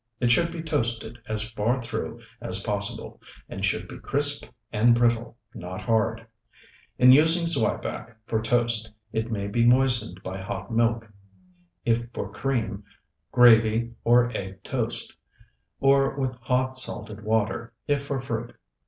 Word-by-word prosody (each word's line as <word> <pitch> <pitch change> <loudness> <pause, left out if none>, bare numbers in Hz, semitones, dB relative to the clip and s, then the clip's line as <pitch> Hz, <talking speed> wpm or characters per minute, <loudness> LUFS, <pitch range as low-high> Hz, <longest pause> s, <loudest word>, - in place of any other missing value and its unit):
It 120 -1 +2
should 170 +6 +3
be 165 -1 -6
toasted 120 -6 -2
as 110 0 -3
far 115 +4 0
through 115 0 -5 0.2
as 95 +2 -1
possible, 100 -1 -3 0.3
and - - -7
should - - 0
be - - -10
crisp 145 0 +1 0.2
and 115 +3 +4
brittle, 120 0 +1 0.2
not 90 +2 -7
hard. 115 0 0 0.7
In 125 0 +7
using 160 +5 +6
zwieback 115 -5 -1
for 110 -1 -1
toast 115 -1 0 0.2
it 110 +1 -1
may 100 -3 -2
be 115 +4 +1
moistened 120 -6 +3
by 95 +1 -5
hot 95 +2 -6
milk, 115 0 +1 0.8
if 120 0 +1
for 100 - -4
cream, 110 -7 -2 0.5
gravy, 115 -1 +5
or 120 +1 +4
egg 95 0 -6
toast; - - -2 0.6
or 135 0 +3
with 130 -2 0
hot 130 +1 -1
salted 105 -4 -6
water, 110 +2 -1 0.2
if 145 -1 +1
for 140 -2 -2
fruit. 120 -2 -5
115 Hz, 140 wpm, -25 LUFS, 110-125 Hz, 0.8 s, In